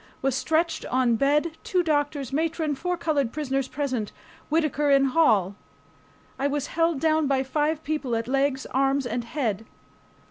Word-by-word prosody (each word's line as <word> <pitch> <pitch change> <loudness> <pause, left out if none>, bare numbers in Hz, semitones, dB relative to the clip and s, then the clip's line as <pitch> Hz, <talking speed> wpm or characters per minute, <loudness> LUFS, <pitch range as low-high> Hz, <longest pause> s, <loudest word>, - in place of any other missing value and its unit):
Was 270 -1 +2
stretched 320 +4 0
on 250 -2 +2
bed, 295 +6 +2
two 360 -1 +1
doctors, 290 -4 -1
matron, 320 0 0
four 355 +6 -2
colored 290 -8 0
prisoners 275 -3 -2
present, 260 -8 -3 0.4
Whittaker 300 -2 +1
in 275 -1 +5
hall. 220 - +3 0.8
I 275 - +1
was 285 -1 -1
held 330 -2 +1
down 315 -1 +2
by 270 -1 +1
five 300 +3 -1
people 295 -6 -2
at 230 0 -2
legs, 270 0 0
arms, 270 +1 +2
and 245 0 -2
head. 230 -5 -2
280 Hz, 150 wpm, -25 LUFS, 265-310 Hz, 0.8 s, in